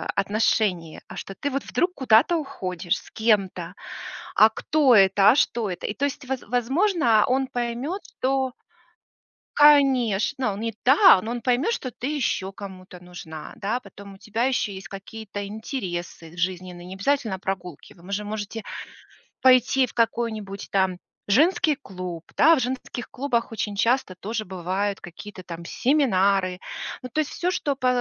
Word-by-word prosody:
отношение. 200 Hz, -5 st, 0 dB
А -, -, -10 dB
что 195 Hz, -, -7 dB
ты 285 Hz, -, -1 dB
вот 275 Hz, 0 st, -2 dB
вдруг 360 Hz, +1 st, 0 dB
куда-то 265 Hz, +6 st, +4 dB
уходишь 185 Hz, -, -3 dB
с -, -, -17 dB
кем-то? 210 Hz, -4 st, 0 dB, 0.6 s
А 215 Hz, -, +7 dB
кто 270 Hz, +3 st, +3 dB
это, 195 Hz, 0 st, +6 dB
а -, -, +2 dB
что 235 Hz, -6 st, +1 dB
это? 180 Hz, -1 st, -4 dB
И -, -, -2 dB
то 280 Hz, -, -1 dB
есть, 270 Hz, -2 st, -4 dB
воз 265 Hz, -1 st, -2 dB
возможно, 250 Hz, -, +2 dB
он 265 Hz, +1 st, +1 dB
поймет, 250 Hz, +9 st, -3 dB, 0.2 s
что 265 Hz, -1 st, 0 dB, 1.0 s
Конечно! 260 Hz, -7 st, +4 dB
Не 225 Hz, +3 st, -3 dB
та, 280 Hz, -, +7 dB
но 225 Hz, -, -4 dB
он 240 Hz, 0 st, -3 dB
поймет, 255 Hz, -, +1 dB
что 260 Hz, -, -3 dB
ты 260 Hz, +5 st, -4 dB
ещё 195 Hz, -8 st, -1 dB
кому-то 190 Hz, -2 st, -10 dB
нужна, 165 Hz, -3 st, -9 dB
да. 220 Hz, +5 st, -2 dB
Потом 200 Hz, -3 st, -13 dB
у -, -, -14 dB
тебя 220 Hz, +3 st, -2 dB
ещё 255 Hz, -5 st, 0 dB
есть 190 Hz, -2 st, -8 dB
какие-то 200 Hz, +1 st, -7 dB
интересы 180 Hz, -, -6 dB
жизненные, 180 Hz, 0 st, -3 dB
необязательно 200 Hz, +2 st, -1 dB
прогулки. 180 Hz, -4 st, -6 dB
Вы 180 Hz, +3 st, -13 dB
же 205 Hz, +1 st, -1 dB
можете 215 Hz, +1 st, -5 dB, 0.8 s
пойти 255 Hz, 0 st, +5 dB
в -, -, -14 dB
какой-нибудь 220 Hz, -4 st, -1 dB
там 190 Hz, -2 st, +1 dB, 0.3 s
женский 305 Hz, -, +3 dB
клуб, 180 Hz, -, -7 dB
да. 325 Hz, +3 st, +6 dB
В -, -, +1 dB
женских 250 Hz, -1 st, -4 dB
клубах 245 Hz, -4 st, -1 dB
очень 210 Hz, -2 st, -3 dB
часто 230 Hz, -3 st, +1 dB
тоже 215 Hz, +4 st, -4 dB
бывают 190 Hz, +2 st, -2 dB
какие-то 185 Hz, +2 st, -10 dB
там 170 Hz, -1 st, -8 dB
семинары. 195 Hz, -, +2 dB, 0.4 s
Ну, 255 Hz, -, -6 dB
то 310 Hz, -, 0 dB
есть 300 Hz, -, -4 dB
всё, 355 Hz, -, -1 dB
что 295 Hz, -6 st, -1 dB
по 255 Hz, -2 st, 0 dB
220 Hz, 155 wpm, -24 LUFS, 190-260 Hz, 1.0 s, А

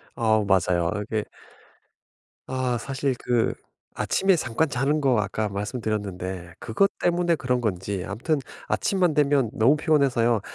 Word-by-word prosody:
아 110 Hz, -3 st, +2 dB
맞아요. 90 Hz, -2 st, +2 dB, 0.2 s
이게 110 Hz, -1 st, -1 dB, 1.2 s
아 130 Hz, -2 st, -1 dB
사실 135 Hz, +1 st, -2 dB
그 120 Hz, -2 st, +1 dB, 0.4 s
아침에 195 Hz, -1 st, +2 dB
잠깐 150 Hz, +1 st, 0 dB
자는 135 Hz, +4 st, 0 dB
거 130 Hz, -5 st, +2 dB
아까 105 Hz, +2 st, -2 dB
말씀드렸는데 100 Hz, -4 st, -4 dB
그것 195 Hz, -, +1 dB
때문에 175 Hz, -1 st, +2 dB
그런 125 Hz, -4 st, -1 dB
건지 95 Hz, -3 st, -2 dB
아무튼 120 Hz, +10 st, -1 dB, 0.3 s
아침만 180 Hz, -5 st, +1 dB
되면 145 Hz, -5 st, +2 dB
너무 125 Hz, +7 st, +4 dB
피곤해서요. 130 Hz, -, +2 dB
120 Hz, 285 characters per minute, -25 LUFS, 105-145 Hz, 1.2 s, 너무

